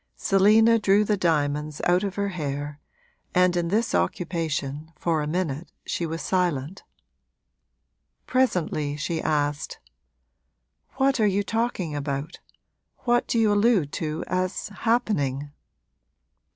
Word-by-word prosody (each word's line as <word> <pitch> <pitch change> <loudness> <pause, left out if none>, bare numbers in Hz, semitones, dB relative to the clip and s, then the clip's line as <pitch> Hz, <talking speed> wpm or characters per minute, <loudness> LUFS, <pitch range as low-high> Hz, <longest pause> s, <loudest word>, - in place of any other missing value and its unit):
Selina 220 +4 +4
drew 205 0 +4
the 210 0 +1
diamonds 150 -4 0
out 180 +2 +3
of 200 -2 -3
her 200 0 -1
hair, 145 -4 -4 0.6
and 180 0 +4
in 175 -1 0
this 220 +6 0
occupation, 160 -3 -2
for 165 -3 0
a 150 - -2
minute, 160 -2 -2
she 170 - -2
was 165 +1 -4
silent. 175 -2 -1 1.4
Presently 165 - 0
she 160 +2 -2
asked: 145 -1 -1 1.2
'What 270 -1 +2
are 215 - +4
you 200 +1 +1
talking 225 -8 -2
about 140 0 -4 0.6
what 240 -1 +2
do - - 0
you 220 -2 +4
allude 205 -8 +3
to 155 0 -3
as 185 +3 -2
happening?' 165 - 0
175 Hz, 120 wpm, -25 LUFS, 150-205 Hz, 1.4 s, Selina